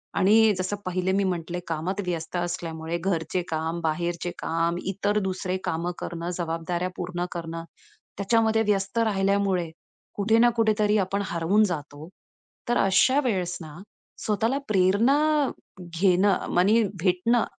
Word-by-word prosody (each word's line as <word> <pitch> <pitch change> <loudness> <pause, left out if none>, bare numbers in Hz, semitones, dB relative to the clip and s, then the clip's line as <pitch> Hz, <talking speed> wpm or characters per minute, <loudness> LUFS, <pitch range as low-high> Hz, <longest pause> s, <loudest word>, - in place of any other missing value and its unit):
आणि 215 +2 +5
जसं 185 +2 -2
पहिले 185 0 -1
मी 200 - +2
म्हटले 175 -2 -2
कामात 170 +5 -3
व्यस्त 170 -1 -4
असल्यामुळे 170 -2 -3
घरचे 170 -1 -1
काम, 160 +1 -2
बाहेरचे 170 +2 -2
काम, 165 +1 0
इतर 200 +2 0
दुसरे 185 0 -2
कामं 170 +2 -1
करणं, 170 0 -5
जबाबदाऱ्या 170 +1 -2
पूर्ण 175 0 -3
करणं, 165 -1 -5 0.5
त्याच्यामध्ये 220 +2 +2
व्यस्त 195 +1 0
राहिल्यामुळे 195 -4 +1 0.5
कुठे 215 +2 +2
ना 240 +1 +6
कुठेतरी 215 -1 +3
आपण 200 +2 -2
हरवून 170 +5 +2
जातो. 150 -4 -5 0.6
तर 240 - +2
अशा 225 +8 +4
वेळेस 180 -7 -1
ना 155 -2 -9 0.5
स्वतःला 225 +5 +1
प्रेरणा 205 +7 +3 0.6
घेणं, 180 +3 +2
मनी 200 +6 +4 0.2
भेटणं 195 +6 +2
185 Hz, 125 wpm, -25 LUFS, 170-205 Hz, 0.6 s, ना